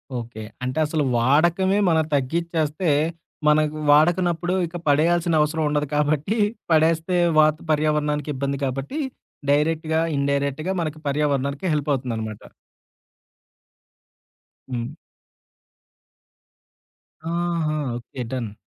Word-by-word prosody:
Okay. 120 Hz, -2 st, -6 dB, 0.2 s
అంటే 130 Hz, +4 st, -2 dB
అసలు 155 Hz, 0 st, 0 dB
వాడకమే 170 Hz, +10 st, +3 dB
మనం 160 Hz, -1 st, +3 dB
తగ్గించేస్తే, 160 Hz, +3 st, -1 dB, 0.6 s
మనం 150 Hz, 0 st, +5 dB, 0.3 s
వాడకనప్పుడు 175 Hz, +3 st, +3 dB
ఇక 165 Hz, -, -12 dB
పడేయాల్సిన 165 Hz, +3 st, +3 dB
అవసరం 155 Hz, +1 st, 0 dB
ఉండదు 150 Hz, 0 st, 0 dB
కాబట్టి, 150 Hz, +7 st, +1 dB, 0.3 s
పడేస్తే 165 Hz, +2 st, +3 dB, 0.2 s
వాత్ 155 Hz, 0 st, +4 dB
పర్యావరణానికిబ్బంది 150 Hz, -2 st, 0 dB
కాబట్టి, 135 Hz, -, -3 dB, 0.5 s
డైరెక్ట్‌గా, 160 Hz, +2 st, +1 dB, 0.2 s
ఇన్‌డైరెక్ట్‌గా 140 Hz, +4 st, -1 dB
మన 155 Hz, -2 st, -3 dB
పర్యావరణానికి 140 Hz, +2 st, 0 dB
హెల్ప్ 150 Hz, 0 st, -2 dB
అవుతుందనమాట. 115 Hz, -5 st, -4 dB, 2.3 s
హ్మ్. 120 Hz, -2 st, -2 dB, 2.5 s
ఆహా! 170 Hz, -3 st, -1 dB, 0.2 s
ఓకే. 125 Hz, +1 st, -7 dB
డన్. 120 Hz, -5 st, -3 dB
150 Hz, 85 wpm, -23 LUFS, 140-165 Hz, 2.5 s, మనం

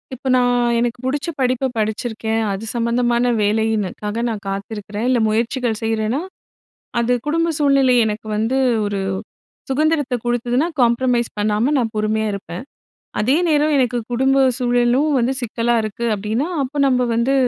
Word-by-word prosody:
இப்ப 265 Hz, +2 st, -8 dB
நான் 245 Hz, -1 st, +2 dB
எனக்கு 240 Hz, 0 st, -1 dB
புடிச்ச 285 Hz, +4 st, -1 dB
படிப்பை 255 Hz, 0 st, +1 dB
படிச்சிருக்கேன். 220 Hz, +1 st, -1 dB
அது 195 Hz, +2 st, -4 dB
சம்மந்தமான 240 Hz, +1 st, +1 dB
வேலைக்காக 210 Hz, 0 st, -1 dB
நான் 215 Hz, -2 st, -5 dB
காத்திருக்கிறேன். 205 Hz, +2 st, -4 dB
இல்லை 250 Hz, -2 st, +2 dB
முயற்சிகள் 230 Hz, +1 st, -1 dB
செய்றேன்னா, 225 Hz, +4 st, 0 dB, 0.8 s
அது 235 Hz, +1 st, +1 dB
குடும்ப 330 Hz, +3 st, +1 dB
சூழ்நிலை 275 Hz, -3 st, +4 dB
எனக்கு 215 Hz, 0 st, -3 dB
வந்து 225 Hz, +5 st, 0 dB, 0.3 s
ஒரு 205 Hz, -1 st, -2 dB, 0.7 s
சுதந்திரத்தை 290 Hz, -1 st, +1 dB
குடுத்ததுனா 240 Hz, +4 st, 0 dB
காம்ப்ரமைஸ் 240 Hz, 0 st, +2 dB
பண்ணாம 215 Hz, +6 st, +1 dB
நான் 230 Hz, -3 st, -1 dB
பொறுமையா 215 Hz, +1 st, 0 dB
இருப்பேன். 200 Hz, +1 st, -6 dB, 0.6 s
அதே 245 Hz, +7 st, +2 dB
நேரம் 300 Hz, -1 st, +2 dB
எனக்கு 245 Hz, -2 st, +1 dB
குடும்ப 265 Hz, +3 st, +2 dB, 0.2 s
சூழலும் 245 Hz, +3 st, +2 dB
வந்து 250 Hz, +2 st, +1 dB
சிக்கலா 235 Hz, 0 st, -1 dB
இருக்கு 215 Hz, +2 st, -4 dB
அப்படின்னா, 215 Hz, +8 st, -2 dB, 0.2 s
அப்ப 270 Hz, +3 st, -6 dB
நம்ப 255 Hz, -1 st, +2 dB
வந்து 235 Hz, +4 st, +1 dB
240 Hz, 135 wpm, -20 LUFS, 220-255 Hz, 0.8 s, சூழ்நிலை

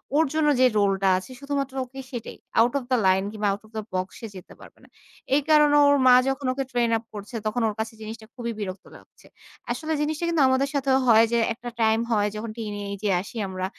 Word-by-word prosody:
ওর 320 Hz, +2 st, +4 dB
জন্য 310 Hz, -1 st, +2 dB
যে 255 Hz, -, +6 dB
রোল 200 Hz, -1 st, +3 dB
টা 195 Hz, -, +2 dB
আছে 185 Hz, +7 st, -8 dB
শুধুমাত্র 280 Hz, -1 st, -3 dB
ওকে 265 Hz, +2 st, -12 dB
সেটাই। 240 Hz, -4 st, -7 dB, 0.2 s
আউট 235 Hz, +2 st, +4 dB
অফ -, -, -10 dB
দ্যা 255 Hz, -, +4 dB
লাইন 190 Hz, +1 st, +3 dB
কিংবা 210 Hz, -1 st, -2 dB
আউট 200 Hz, -, -4 dB
অফ 215 Hz, -, -20 dB
দ্যা 215 Hz, -, -3 dB
বক্স 185 Hz, +1 st, -2 dB
সে 225 Hz, -, -5 dB
যেতে 185 Hz, -, -11 dB
পারবে -, -, -15 dB
না। -, -, -18 dB, 0.5 s
এই 290 Hz, -, +3 dB
কারণে 300 Hz, -1 st, +5 dB
ওর 285 Hz, 0 st, +5 dB
মা 250 Hz, -, +8 dB, 0.2 s
যখন 270 Hz, +1 st, -3 dB
ওকে 270 Hz, +1 st, -2 dB
ট্রেইন 240 Hz, -1 st, +1 dB
আপ 225 Hz, -, -9 dB
করছে, 210 Hz, +4 st, -8 dB
তখন 215 Hz, +3 st, -1 dB
ওর 215 Hz, -, -2 dB
কাছে 220 Hz, +1 st, -3 dB
জিনিসটা 220 Hz, +1 st, -8 dB
খুবই 235 Hz, -2 st, -4 dB
বিরক্ত 190 Hz, -2 st, -6 dB
লাগছে। -, -, -19 dB, 0.4 s
আসলে 315 Hz, 0 st, -3 dB
জিনিসটা 305 Hz, +2 st, -2 dB
কিন্তু 335 Hz, -3 st, +1 dB
আমাদের 265 Hz, +2 st, +1 dB
সাথেও 270 Hz, -1 st, +2 dB
হয় 225 Hz, -1 st, +7 dB
যে -, -, +3 dB, 0.2 s
একটা 240 Hz, +1 st, -8 dB
টাইম 220 Hz, 0 st, +3 dB
হয় 210 Hz, -2 st, +2 dB
যখন 220 Hz, +1 st, -5 dB
টিনেজে 205 Hz, -2 st, -4 dB
আসি 205 Hz, -, -12 dB
আমরা। 185 Hz, -1 st, -4 dB
230 Hz, 225 wpm, -24 LUFS, 210-270 Hz, 0.5 s, মা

